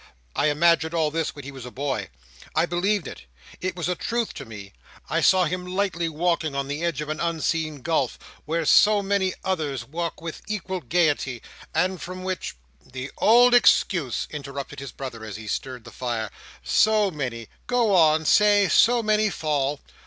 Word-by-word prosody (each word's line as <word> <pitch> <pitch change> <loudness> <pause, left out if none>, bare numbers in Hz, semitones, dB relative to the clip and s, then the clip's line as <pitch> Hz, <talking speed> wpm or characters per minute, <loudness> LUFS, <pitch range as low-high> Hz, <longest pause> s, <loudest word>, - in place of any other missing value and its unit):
"I - - +2
imagined 160 +2 +3
all 155 -2 +1
this 165 -1 -2
when 145 -3 -9
he 140 - -7
was 135 -2 -10
a 125 - -7
boy. 130 -6 -3 0.5
I 160 - +3
believed 175 +1 0
it. 65 - -10 0.4
It 185 0 -2
was 175 -2 -3
a 180 - +1
truth 235 +5 -2
to - - -8
me. 105 -3 -10 0.4
I - - +1
saw 185 -1 +5
him 180 +2 -2
lightly 180 -2 -1
walking 160 -2 0
on 140 0 -2
the 145 +4 -4
edge 170 -4 -1
of 150 - -5
an 155 - -3
unseen 160 -3 -1
gulf 155 -7 0 0.3
where 165 +1 -1
so 210 +5 +5
many 195 -1 0
others 155 -8 -2
walk 170 +3 -4
with 165 -1 -7
equal 190 -3 -3
gaiety, 145 -5 0 0.3
and 185 0 0
from 185 +1 -7
which—" 185 - -4 0.3
"The 130 +1 -7
old 245 +3 +6
excuse," 175 - +3
interrupted 140 -1 -6
his 140 -1 -7
brother, 125 -5 -7
as 110 -3 -7
he 110 +1 -8
stirred 125 +3 -4
the 120 - -12
fire. 115 -4 -3 0.3
"So 215 -2 +3
many. 125 -7 -4 0.2
Go 240 -4 +2
on. 160 -3 +4
Say, 205 +1 +5
so 235 +7 +4
many 215 0 +2
fall." 145 -5 -1
160 Hz, 180 wpm, -24 LUFS, 140-185 Hz, 0.5 s, old